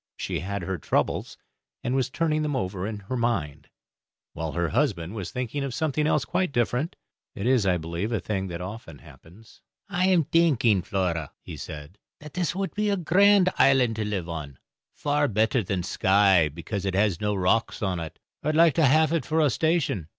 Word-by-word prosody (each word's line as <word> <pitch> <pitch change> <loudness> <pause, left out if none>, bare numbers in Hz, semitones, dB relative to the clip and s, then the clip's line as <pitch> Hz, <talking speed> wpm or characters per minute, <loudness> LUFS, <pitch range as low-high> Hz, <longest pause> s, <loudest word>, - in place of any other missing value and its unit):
She - - -3
had 100 0 -4
her 95 0 -3
troubles, - - -1 0.5
and 125 - -1
was 130 -1 +1
turning 155 +1 0
them 150 -2 -1
over 95 -5 -2
in 105 -2 -5
her 105 +6 -5
mind, 85 - -2 0.6
while 80 -1 -4
her 85 -1 0
husband 105 - 0
was 100 -5 -5
thinking 125 +2 -3
of 135 -4 -4
something 155 -1 0
else 150 -5 +1
quite 185 +6 -1
different. 125 +5 0 0.4
It 100 - -4
is, 125 -5 +3
I 90 -1 +3
believe, 85 +6 -4
a 115 - 0
thing 95 +1 -3
that 85 -1 -6
often 95 -5 -8
happens. 95 +10 -17 0.3
"I 185 -1 +1
am 180 -4 +4
thinking, 140 - +3
Flora," 90 - -2
he - - -8
said, 75 +6 -9 0.2
"that 150 -1 -11
this 175 -2 -1
would 195 0 -3
be 210 0 0
a 200 - +1
grand 190 +2 +4
island 130 -4 +4
to 110 - -1
live 100 -5 -3
on 75 -6 -6 0.3
far 145 0 0
better 110 +2 +1
than 95 -2 -2
Skye, 95 -3 +3
because 85 +6 -5
it 95 -1 -1
has 100 -3 +1
no 105 0 0
rocks 100 +4 0
on 95 -3 -1
it. 80 -1 -7 0.2
I - - -5
would 155 - +1
like 165 -1 +6
to 160 +2 +3
haf 155 +3 +4
it 165 -2 0
for 160 +1 0
a 150 -4 +3
station. 155 - 0
110 Hz, 200 wpm, -26 LUFS, 90-150 Hz, 0.6 s, like